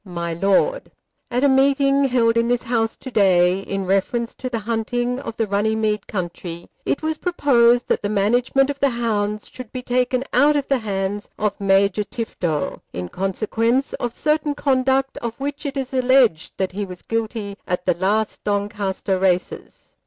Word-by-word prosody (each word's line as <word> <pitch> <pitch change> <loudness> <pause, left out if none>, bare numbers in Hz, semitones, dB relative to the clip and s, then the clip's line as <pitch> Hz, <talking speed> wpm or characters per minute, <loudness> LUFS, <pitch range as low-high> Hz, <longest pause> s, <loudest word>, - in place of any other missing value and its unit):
MY 170 -3 -4
LORD, 200 - +1 0.4
At 250 +2 0
a - - +6
meeting 275 +1 +3
held 235 -3 +2
in 230 0 +2
this 245 0 +1
house 225 -1 -1
to 260 - -9
day 185 -4 +4
in 195 0 -4
reference 195 +5 0
to 255 - -5
the 240 - -2
hunting 240 +2 -1
of 230 -4 -7
the 225 - +1
Runnymede 210 +1 0
country, 175 -3 -5 0.2
it 285 - 0
was 315 0 -1
proposed 245 -9 +3
that - - +1
the 205 - -2
management 245 +7 +2
of 280 - -8
the 280 - +3
hounds 215 -3 -1
should 255 -4 -10
be 255 -1 -5
taken 250 +1 +1
out 290 +4 +5
of 285 -2 0
the 275 -2 +2
hands 200 -1 -3
of 210 -1 -2
Major 200 +1 +3
Tifto, 175 -9 -3
in 90 0 -5
consequence 225 +7 0
of 240 - -3
certain 300 +3 0
conduct 270 -1 +1
of 235 +1 -5
which 285 +2 -4
it 275 0 -5
is 265 -1 -4
alleged 255 -9 +3
that 190 -1 -1
he 205 +3 -3
was 180 -2 -8
guilty 220 -3 -3
at 180 0 -2
the 180 - +3
last 200 +5 -1
Doncaster 200 -2 -1
races. 185 -1 -2
225 Hz, 175 wpm, -21 LUFS, 195-255 Hz, 0.4 s, a